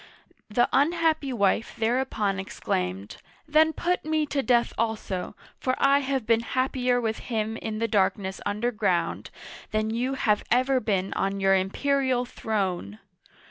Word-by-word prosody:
The 240 +3 +3
unhappy 315 0 +2
wife 215 -1 +1
thereupon 220 -4 0
exclaimed, 95 - -3 0.3
Then 310 +1 +4
put 355 +3 -1
me 310 0 0
to 285 -1 -1
death 240 -2 +2
also, 210 -4 -2 0.2
for 255 0 0
I 275 +1 +4
have 270 -3 -2
been 225 0 +3
happier 250 +1 0
with 220 -2 -2
him 220 -2 -2
in 220 -2 -4
the 230 +1 0
darkness 195 -2 0
underground 210 -4 -1 0.4
than 215 0 -1
you 250 +4 -1
have 210 -5 +1
ever 255 +2 +3
been 195 -4 -1
on 195 0 -1
your 195 0 +4
imperial 255 +6 +1
throne 190 - -3
230 Hz, 140 wpm, -26 LUFS, 200-265 Hz, 0.4 s, Then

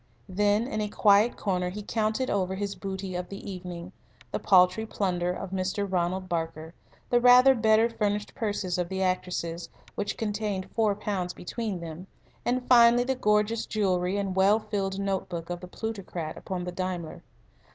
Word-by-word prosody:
Then, 205 +3 +2
in 230 -5 -3
a 210 - -2
quiet 205 +3 +4
corner, 180 -3 -1
he 205 +3 -6
counted 220 +4 -1
over 190 -1 0
his 200 0 -3
booty 190 -1 -5
of 180 0 -4
the 200 +1 -8
evening 180 -1 -7 0.4
the - - -2
paltry 185 +2 +4
plunder 180 -5 -1
of 185 +1 -6
Mr. 190 +2 -1
Ronald 185 0 -1
Barker, 165 -1 -3 0.4
the 240 0 +4
rather 250 +2 +8
better 220 -1 +4
furnished 210 -2 -2
purses 205 -7 -2
of 175 -1 -1
the 190 0 -1
actresses, 180 -2 -2 0.2
which 205 0 -3
contained 205 -3 -2
four 215 -3 +2
pounds 195 -4 -3
between 200 0 -4
them, 165 +2 -8 0.4
and, 250 +1 -1
finally, 240 -1 +7
the 265 +2 0
gorgeous 210 -2 +1
jewellery 185 -2 0
and 195 -2 -2
well 195 +3 +5
filled 195 -3 -3
note 195 -2 -2
book 170 -1 -5
of 175 - -3
the 180 - -9
plutocrat 185 -6 -5
upon 185 -2 -5
the 180 - -4
Daimler. 175 -3 -4
195 Hz, 170 wpm, -27 LUFS, 180-215 Hz, 0.4 s, rather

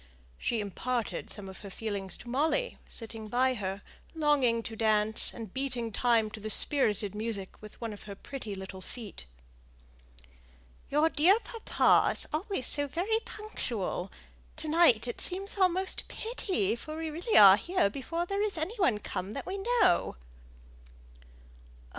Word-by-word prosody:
She 230 -2 -1
imparted 235 +4 -3
some 205 -2 -7
of 190 - -10
her 200 - -9
feelings 195 -3 -3
to - - -13
Molly, 310 - 0
sitting 225 -1 -5
by 255 +4 +2
her, 195 -3 -4 0.3
longing 275 -7 +2
to 225 - -6
dance, 215 -1 +4
and 220 -5 -9
beating 250 -4 -2
time 225 -1 +2
to 215 - -8
the 215 +1 -5
spirited 210 -5 +3
music 210 -3 -5
with 215 -1 -12
one 230 -2 -4
of 205 - -11
her 200 -1 -7
pretty 225 -2 -7
little 190 0 -8
feet. 205 - -10 1.6
"Your 300 +3 +3
dear 330 +6 +5
papa 460 -2 +3
is - - -5
always 340 - -2
so 290 -1 0
very 375 +10 0
punctual! 235 - -4 0.4
To 310 0 -4
night 300 -9 +5
it 240 - -5
seems 390 +2 -5
almost 375 -1 +3
a - - -18
pity, 375 - -1
for 310 +6 -7
we 320 -1 -3
really 350 +9 +1
are 195 -1 +10
here 350 - +1
before 330 +10 -3
there 395 +2 -2
is 415 -4 -1
any 320 +8 -3
one 265 - +3
come 200 -1 -5
that - - -5
we 385 +2 -4 0.2
know." 370 -3 +3
245 Hz, 155 wpm, -30 LUFS, 210-330 Hz, 1.6 s, are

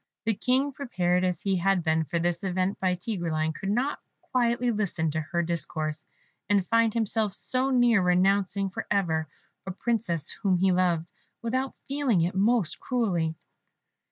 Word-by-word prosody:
The 225 - +2
King, 260 +6 +1
prepared 185 -10 0
as 180 -1 -1
he 195 -2 +1
had 190 0 +2
been 160 -1 +1
for 160 +4 -2
this 170 +2 -1
event 185 +1 -1
by 185 -1 +1
Tigreline, 170 -5 -2
could 195 +5 -5
not 250 +7 0 0.2
quietly 240 -1 +1
listen 190 -7 -1
to 160 +1 -1
her 170 +3 -1
discourse, 155 -2 -2 0.4
and 200 -3 +3
find 230 -1 +4
himself 220 -2 0
so 260 +1 0
near 245 -5 +4
renouncing 195 +2 +2
for - - -5
ever 160 -6 +1 0.4
a - - -2
Princess 185 -7 -1
whom 190 -3 +1
he 190 +1 +3
loved, 175 -2 +1 0.3
without 255 +3 -1
feeling 270 -9 +1
it 170 +3 0
most 205 -1 +1
cruelly. 180 -11 0
190 Hz, 155 wpm, -27 LUFS, 170-230 Hz, 0.4 s, find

